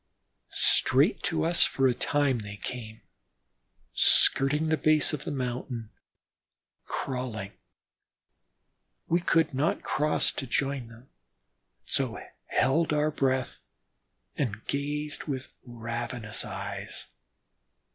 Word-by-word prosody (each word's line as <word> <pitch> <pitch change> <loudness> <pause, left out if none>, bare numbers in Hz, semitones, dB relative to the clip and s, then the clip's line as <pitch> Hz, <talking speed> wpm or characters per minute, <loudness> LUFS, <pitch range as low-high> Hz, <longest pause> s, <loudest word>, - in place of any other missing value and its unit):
Straight 135 +9 +4
to 165 - 0
us 170 +1 +4
for 135 -1 +2
a 125 - +3
time 140 0 +1
they 105 -1 -7
came, 110 -1 -7 0.9
skirting 150 +4 +4
the 160 - +3
base 155 0 +4
of 150 - -4
the - - -3
mountain, 125 -4 -4 0.9
crawling. 120 -6 -4 1.5
We 170 - +2
could 165 -3 +2
not 140 +5 0
cross 150 0 +1
to 135 - -5
join 135 -1 -1
them, 115 +3 -15 0.8
so - - 0 0.3
held 155 +6 +2
our 150 +1 +2
breath 130 -3 -1 0.8
and 110 -6 -3
gazed 150 +1 -3
with 135 -3 -5
ravenous 115 -1 -4
eyes. - - -5
135 Hz, 105 wpm, -28 LUFS, 120-150 Hz, 1.5 s, Straight